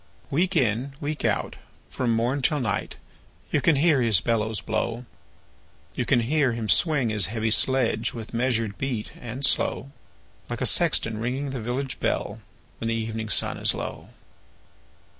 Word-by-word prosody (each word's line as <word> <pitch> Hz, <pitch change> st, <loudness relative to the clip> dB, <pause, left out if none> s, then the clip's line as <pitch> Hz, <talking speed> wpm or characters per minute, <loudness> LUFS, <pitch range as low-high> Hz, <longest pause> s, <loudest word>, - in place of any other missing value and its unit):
Week 180 Hz, +6 st, +1 dB
in, 125 Hz, 0 st, +1 dB
week 150 Hz, 0 st, -3 dB
out, -, -, 0 dB, 0.3 s
from 125 Hz, -2 st, -1 dB
morn 125 Hz, +5 st, 0 dB
till 150 Hz, +3 st, +2 dB
night, 105 Hz, -6 st, -2 dB, 0.6 s
You 145 Hz, -, +2 dB
can 165 Hz, +1 st, +4 dB
hear 145 Hz, -1 st, +4 dB
his 110 Hz, -6 st, +4 dB
bellows 110 Hz, +2 st, 0 dB
blow; 115 Hz, +2 st, -2 dB, 0.9 s
You -, -, -2 dB
can 120 Hz, -, +4 dB
hear 135 Hz, +1 st, +2 dB
him 115 Hz, -2 st, -4 dB
swing 150 Hz, -8 st, +3 dB
his 105 Hz, -4 st, +1 dB
heavy 110 Hz, +1 st, -1 dB
sledge, 130 Hz, +1 st, +2 dB
With 115 Hz, -1 st, -8 dB
measured 115 Hz, -4 st, 0 dB
beat 125 Hz, -6 st, -3 dB
and 125 Hz, +3 st, -2 dB
slow, 135 Hz, +1 st, 0 dB, 0.6 s
Like -, -, -4 dB
a -, -, +2 dB
sexton 110 Hz, -1 st, +3 dB
ringing 130 Hz, +4 st, -2 dB
the 130 Hz, -3 st, -4 dB
village 130 Hz, +4 st, -3 dB
bell, -, -, -1 dB, 0.4 s
When 115 Hz, -, -3 dB
the 115 Hz, -, 0 dB
evening 110 Hz, -1 st, -3 dB
sun -, -, +1 dB
is -, -, +1 dB
low. -, -, -6 dB
120 Hz, 160 wpm, -25 LUFS, 110-135 Hz, 0.9 s, can